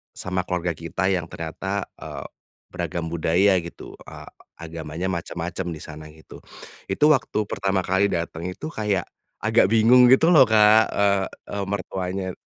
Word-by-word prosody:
sama 95 0 -3
keluarga 90 -1 -1
kita 85 +4 -2
yang 90 -3 -1
ternyata, 80 -1 -4 0.2
eee, - - -7 0.5
beragam 85 -2 -4
budaya 90 +4 +2
gitu, 85 0 -10
eee, - - -11 0.3
agamanya 80 +1 -6
macem-macem 85 0 -4
di 75 - -10
sana 75 0 -10
gitu, 80 - -14 0.5
itu 95 +9 -2
waktu 130 -6 +1
pertama 95 -1 -1
kali 95 +2 +2
dateng 85 -2 -4
itu 150 - -6
kayak, 105 - -1 0.4
agak - - +4
bingung 120 +3 +6
gitu 160 +6 +5
loh 140 -6 +7
Kak, 110 0 +5
eee 100 -1 +2 0.2
eee, 100 -1 -3
mertuanya. 95 -1 -4
95 Hz, 145 wpm, -23 LUFS, 85-100 Hz, 0.5 s, loh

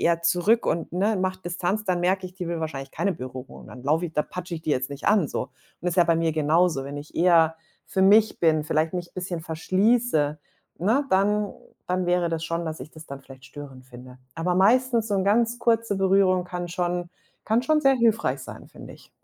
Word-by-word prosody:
eher 170 0 +1
zurück 180 +7 +2
und, 165 0 -1
ne, 205 +3 +1
macht 185 0 -3
Distanz, 180 +4 -2
dann 180 -3 0
merke 185 +1 +1
ich, 180 - -13
die 180 -3 -5
will 170 -1 -2
wahrscheinlich 135 -4 -5
keine 200 -2 -1
Berührung. 130 -3 -9
Dann 125 - -11
laufe 160 +5 +1
ich 160 - -12
da 150 - +2
patsche 180 -1 -7
ich 160 - -7
die 155 - -2
jetzt 130 -1 0
nicht 140 +1 -7
an 205 -8 +3
so. - - -4 0.3
Ist 180 0 -2
ja 175 - +6
bei 165 0 +2
mir 165 -1 0
genauso. 155 -1 +2
Wenn 140 +1 -7
ich 145 +1 -9
eher 165 -2 +4 0.3
für 190 - -2
mich 210 +3 +4
bin, 155 -2 +3
vielleicht 155 +3 0
mich 175 -1 -4
'n - - -45
bisschen 180 -2 -4
verschließe, 180 -1 +1 0.4
ne, 225 - +2
dann 205 +2 +2 0.3
dann 180 0 -1
wäre 175 -1 +1
das 165 -1 -2
schon, 165 +1 -2
dass 160 -4 -5
ich 145 +5 -9
das 155 0 -12
dann 140 0 -8
vielleicht 135 -1 -15
störend 135 -3 -11
finde. 125 0 -13 0.2
Aber 175 +2 -1
meistens 230 +4 +3
so 205 - 0
'n 190 - 0
ganz 230 +3 +2
kurze 230 -4 +1
Berührung 190 -1 +3
kann 180 -1 -5
schon 175 0 -2 0.3
kann 225 +3 +1
schon 310 +2 +2
sehr 270 - +5
hilfreich 230 -3 +1
sein, - - -10
finde - - -12
ich. - - -20
175 Hz, 220 wpm, -25 LUFS, 155-195 Hz, 0.4 s, ja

